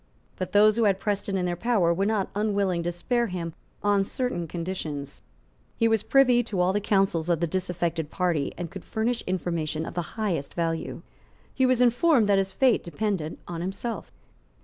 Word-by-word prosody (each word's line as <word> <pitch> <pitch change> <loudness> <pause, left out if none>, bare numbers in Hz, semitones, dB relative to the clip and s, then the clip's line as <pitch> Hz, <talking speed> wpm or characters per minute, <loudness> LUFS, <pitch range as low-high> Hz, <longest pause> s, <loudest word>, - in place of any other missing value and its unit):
But 185 - -4
those 210 +1 +5
who 230 - +3
had 195 -2 +3
Preston 200 -1 -1
in 180 - 0
their 175 -1 -1
power 185 -4 +2
were 195 +4 0
not 210 -3 0
unwilling 200 -4 0
to 175 +1 -1
spare 235 +7 0
him 170 -4 -4 0.3
on 205 -1 +3
certain 195 -6 -3
conditions. 160 -5 -5 0.6
He 230 - +3
was 225 -2 +2
privy 245 +2 +4
to 215 -5 -4
all 180 +1 +3
the 205 - 0
counsels 195 -5 +1
of 170 -3 +2
the 170 - +1
disaffected 170 -2 -2
party, 170 -6 0
and 175 -2 -5
could 195 - -8
furnish 230 +2 -1
information 165 -4 -2
of - - -7
the 175 - -1 0.2
highest 185 -10 -2
value. 165 -1 -2 0.5
He 260 -1 +3
was 255 -1 +2
informed 245 0 +4
that 200 -1 +5
his 195 0 -1
fate 250 +4 +3
depended 180 -3 -2
on 170 -1 -5
himself. 195 +5 -4
190 Hz, 185 wpm, -26 LUFS, 170-220 Hz, 0.6 s, those